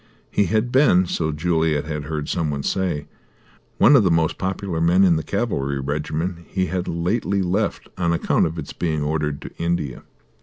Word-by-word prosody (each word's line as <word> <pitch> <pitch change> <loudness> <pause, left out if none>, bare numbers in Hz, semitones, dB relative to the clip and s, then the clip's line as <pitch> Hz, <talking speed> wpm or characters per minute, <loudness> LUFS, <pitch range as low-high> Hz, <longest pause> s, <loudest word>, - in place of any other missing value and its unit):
He 100 - +2
had 110 +6 0
been, 125 -10 +5
so 80 -2 -1
Juliet 80 -1 0
had 75 -2 -4
heard 75 -1 -3
some 85 -4 -1
one 70 -1 -3
say, 85 -6 -1 0.7
one 145 - +6
of 125 - +6
the 95 - +3
most 80 -1 +1
popular 95 -3 -2
men 90 +3 +4
in 90 -3 +5
the 80 - 0
cavalry 70 - -2
regiment 75 +5 -2
he 95 -1 -1
had 90 +1 -3
lately 95 +3 0
left 100 +4 -1
on 85 -2 +1
account 85 - +2
of 80 +1 -6
its 80 - -6
being 80 -3 -1
ordered 75 -1 -1
to - - -9
India. 85 -6 -2
85 Hz, 185 wpm, -22 LUFS, 75-95 Hz, 0.7 s, one